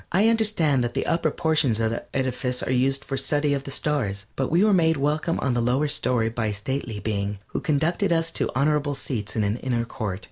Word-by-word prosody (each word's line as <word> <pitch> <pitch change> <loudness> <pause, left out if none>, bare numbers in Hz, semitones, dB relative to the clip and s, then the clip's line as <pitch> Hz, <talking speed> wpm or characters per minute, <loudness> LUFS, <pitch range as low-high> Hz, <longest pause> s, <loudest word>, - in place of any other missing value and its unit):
I 200 +6 +4
understand 205 - +2
that 120 +1 -3
the 135 - 0
upper 165 -1 +1
portions 150 -7 +1
of 110 -1 +1
the 115 - -4
edifice 125 -1 -1
are - - -2
used 135 +2 +2
for 135 - -3
study 145 +2 +1
of 140 -1 -2
the - - -6
Stars, 125 -9 -1
but 135 - -1
we 170 +5 +3
were 215 -1 +4
made 160 -3 +3
welcome 150 +4 0
on 135 - +1
the 120 - +1
lower 130 +5 +1
story 125 -5 0
by 115 -1 -2
a 105 - -1
stately 115 0 -4
being, 100 0 -2
who - - -3
conducted 160 +3 +1
us 165 -1 +1
to - - -1
honorable 145 +1 +1
seats 115 -6 -4
in 110 - +1
an 105 +3 0
inner 120 -2 -1
court. 105 -6 -4
135 Hz, 225 wpm, -24 LUFS, 115-155 Hz, -, I